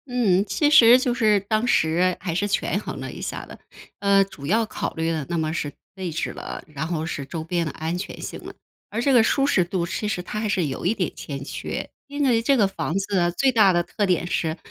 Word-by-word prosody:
嗯， 220 -7 +2
其 205 +9 +1
实 245 -5 +8
就 255 -1 0
是 215 -4 +3
当 215 +4 -1
时 175 -2 +2
还 170 - -3
是 205 +5 0
权 200 0 0
衡 - - -6
了 - - -5
一 - - -9
下 - - -5
的。 - - -12 0.4
呃， 200 -1 +4
主 140 -7 -10
要 225 +5 +2
考 - - -4
虑 165 0 0
的 155 -3 -2
那 170 - -1
么 160 -1 -1
是 145 -3 -3 0.2
位 185 -3 -4
置 160 - -2
了， - - -7
然 150 0 -5
后 160 -2 -2
是 150 -4 -4
周 160 +3 -5
边 170 +1 -1
的 - - -3
安 160 +4 -3
全 180 - -6
性 - - -7
了， - - -9 0.3
而 225 - -2
这 275 +2 +2
个 240 - +7
舒 275 +5 +2
适 275 -10 +3
度 175 0 -2
其 210 +5 -3
实 180 -4 -2
它 210 - -4
还 215 -1 -1
是 185 -4 +1
有 135 +2 -4
一 190 - +3
点 180 -6 -2
欠 140 -2 -6
缺。 - - -5 0.2
因 285 +1 -2
为 230 -3 +3
这 275 +3 +3
个 210 -4 +4
房 195 -4 -3
子 190 -3 +1
最 270 -1 +4
大 210 -4 +6
的 175 -1 +2
特 205 - -2
点 180 -2 +1
是 160 -2 -1
190 Hz, 265 characters per minute, -23 LUFS, 165-220 Hz, 0.4 s, 实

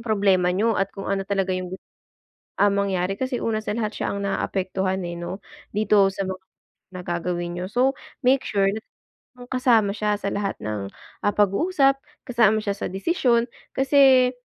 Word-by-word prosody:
problema 195 -4 +3
niyo 225 +4 +2
at 195 - +1
kung 195 - -6
ano 195 -1 -1
talaga 195 -2 0
yung 185 0 -3
gu - - -6 0.8
ah, 205 0 +5
mangyari, 195 -2 0
kasi 255 -1 -2
una 220 -1 0
sa 210 - -3
lahat 220 -2 -2
siya - - -1
ang 200 - -3
naapektuhan, 190 -1 -1
eh, 170 - -5
'no, 175 +2 -5 0.3
dito 210 -2 +3
sa 195 0 -4
mga 190 0 -5 0.5
na 185 -1 -8
gagawin 175 0 -2
niyo. 180 +2 -4
So, 255 +4 +2 0.3
make 260 +1 +4
sure 200 -2 0
na 220 - -5 0.7
kasama 240 -5 +3
siya 210 0 0
sa 200 - -2
lahat 200 -1 -2
ng, 105 -2 -3 0.4
ah, 205 - +2
pag-uusap, 270 - +3 0.2
kasama 220 -3 +3
siya 200 -1 -2
sa - - -3
desisyon, 235 - +1 0.2
kasi 265 -2 +5
200 Hz, 170 wpm, -24 LUFS, 190-235 Hz, 0.8 s, ah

